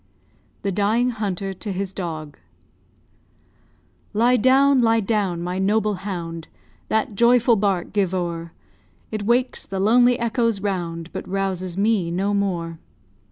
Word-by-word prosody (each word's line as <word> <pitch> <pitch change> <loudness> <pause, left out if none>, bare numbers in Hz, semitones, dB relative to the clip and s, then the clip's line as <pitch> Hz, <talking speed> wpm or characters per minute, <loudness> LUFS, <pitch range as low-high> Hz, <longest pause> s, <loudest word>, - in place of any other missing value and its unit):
THE 200 - 0
DYING 215 +6 +1
HUNTER 195 -4 -3
TO 200 +2 -6
HIS 195 0 -3
DOG 155 -6 -6 1.7
Lie 235 +4 +4
down, 265 +3 +4
lie 225 -1 +3
down, 195 -5 -1
my 180 +1 -3
noble 210 +2 +1
hound! 170 -4 -5 0.4
That 220 0 0
joyful 235 +2 +4
bark 195 -4 -1
give 200 -4 +1
o'er; 170 -2 -3 0.6
It 215 -2 -3
wakes 250 +2 +1
the 195 - -4
lonely 240 +4 +4
echoes 230 -2 0
round, 175 -4 -3
But - - -6
rouses 185 -2 -2
me 200 -4 +1
no 195 +4 -1
more. 175 -5 -2
200 Hz, 130 wpm, -22 LUFS, 180-225 Hz, 1.7 s, Lie